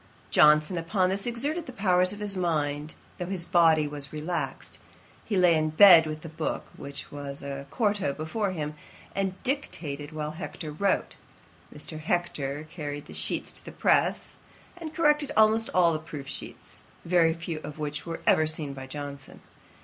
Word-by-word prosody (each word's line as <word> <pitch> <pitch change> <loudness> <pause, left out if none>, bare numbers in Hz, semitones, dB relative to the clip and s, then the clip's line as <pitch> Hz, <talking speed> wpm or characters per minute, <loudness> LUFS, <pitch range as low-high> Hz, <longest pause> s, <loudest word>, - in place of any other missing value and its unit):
Johnson 150 +4 +5
upon 185 +3 +1
this 195 +4 -1
exerted 290 +8 -1
the - - -6
powers 185 -5 +3
of 205 - -6
his 205 -1 -2
mind, 150 -4 -1 0.2
though 180 - -3
his 185 -2 -1
body 160 -4 +4
was 145 -1 -3
relaxed. 155 +3 -4 0.5
He 205 - -1
lay 180 -2 +6
in 155 0 +1
bed 165 0 +8
with 155 0 -5
the - - -6
book, 160 0 -4
which 140 0 -8
was 140 -1 -6
a 140 0 -6
quarto, 205 - +1
before 160 +8 -2
him, 155 -5 -4 0.4
and 195 -1 -1
dictated 155 - -2
while 155 -1 -4
Hector 155 -1 -7
wrote. 195 +6 0 0.5
Mr. 155 +1 -7
Hector 155 -4 -2
carried 145 -3 -6
the - - -11
sheets - - -3
to - - -11
the - - -9
press, - - +1 0.4
and 330 -3 -7
corrected 300 -3 +2
almost 220 +1 +4
all 170 -2 +4
the 155 - -1
proof 150 -3 -8
sheets, - - -7 0.2
very 165 -2 +3
few 165 -1 -5
of 150 -1 -8
which 150 0 -4
were 165 -1 -6
even 155 - +5
seen 155 -3 -1
by 135 -1 -8
Johnson. 140 0 -8
160 Hz, 170 wpm, -27 LUFS, 150-190 Hz, 0.5 s, bed